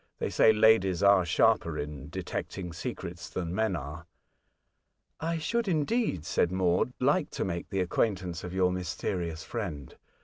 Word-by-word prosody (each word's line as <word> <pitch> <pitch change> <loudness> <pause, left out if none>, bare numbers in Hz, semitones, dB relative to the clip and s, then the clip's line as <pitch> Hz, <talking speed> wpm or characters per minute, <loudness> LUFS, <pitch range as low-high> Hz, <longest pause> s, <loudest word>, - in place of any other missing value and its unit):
They - - -2
say 110 - +6
ladies 105 -4 +4
are 100 -2 +6
sharper 85 - +2
in 75 -1 -6
detecting 90 +2 -5
secrets 85 -4 -6
than 85 -2 -3
men 110 -1 +1
are." 75 +3 -7 0.6
'' - - -50 0.3
I 165 +1 -1
should, 230 +8 -1
indeed," 165 - 0
said 85 - +1
Maud, 95 +4 +1
*' - - -47
like 145 +5 +2
to - - -3
make 85 -2 -4
the 95 -2 0
acquaintance 90 -2 -1
of 90 - -5
your 90 -1 +2
mysterious 85 -1 -3
friend. 85 - -5
90 Hz, 160 wpm, -29 LUFS, 85-110 Hz, 0.6 s, say